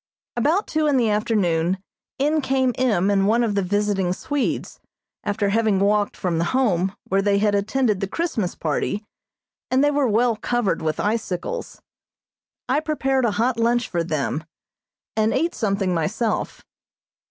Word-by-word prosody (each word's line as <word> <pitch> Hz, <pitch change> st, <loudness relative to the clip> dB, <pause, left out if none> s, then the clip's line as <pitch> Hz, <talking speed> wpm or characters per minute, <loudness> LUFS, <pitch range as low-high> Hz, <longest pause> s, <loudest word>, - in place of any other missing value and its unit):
About 305 Hz, -, +2 dB
two 310 Hz, -1 st, 0 dB
in 285 Hz, -2 st, +3 dB
the 230 Hz, -4 st, +2 dB
afternoon 190 Hz, -5 st, +1 dB, 0.4 s
in 300 Hz, +3 st, +2 dB
came 265 Hz, -2 st, +1 dB
M. 205 Hz, -7 st, +2 dB
and 195 Hz, -1 st, +2 dB
one 230 Hz, +3 st, +3 dB
of 220 Hz, -3 st, 0 dB
the 200 Hz, -, +1 dB
visiting 195 Hz, -1 st, 0 dB
Swedes, 285 Hz, +7 st, -2 dB, 0.4 s
after 205 Hz, 0 st, 0 dB
having 215 Hz, -2 st, +2 dB
walked 205 Hz, +1 st, +1 dB
from 170 Hz, -3 st, -1 dB
the -, -, +2 dB
Home, 190 Hz, -7 st, +1 dB
where 195 Hz, +1 st, +1 dB
they 200 Hz, 0 st, +2 dB
had 205 Hz, 0 st, +2 dB
attended 210 Hz, +1 st, +1 dB
the 195 Hz, -, -2 dB
Christmas 220 Hz, -, -2 dB
party, 200 Hz, +7 st, -2 dB, 0.6 s
and 260 Hz, +2 st, +3 dB
they 290 Hz, -, +4 dB
were 285 Hz, -2 st, +2 dB
well 230 Hz, +2 st, +2 dB
covered 230 Hz, -1 st, -1 dB
with 155 Hz, -1 st, -2 dB
icicles. 205 Hz, -4 st, -3 dB, 0.8 s
I 270 Hz, +3 st, +2 dB
prepared 270 Hz, -4 st, 0 dB
a 225 Hz, -, +2 dB
hot 235 Hz, +1 st, +1 dB
lunch 240 Hz, +1 st, +2 dB
for 170 Hz, -2 st, -1 dB
them, 155 Hz, -1 st, -2 dB, 0.7 s
and 220 Hz, 0 st, +2 dB
ate 330 Hz, +6 st, +1 dB
something 195 Hz, -4 st, 0 dB
myself. 210 Hz, +7 st, -2 dB
215 Hz, 155 wpm, -22 LUFS, 195-255 Hz, 0.8 s, they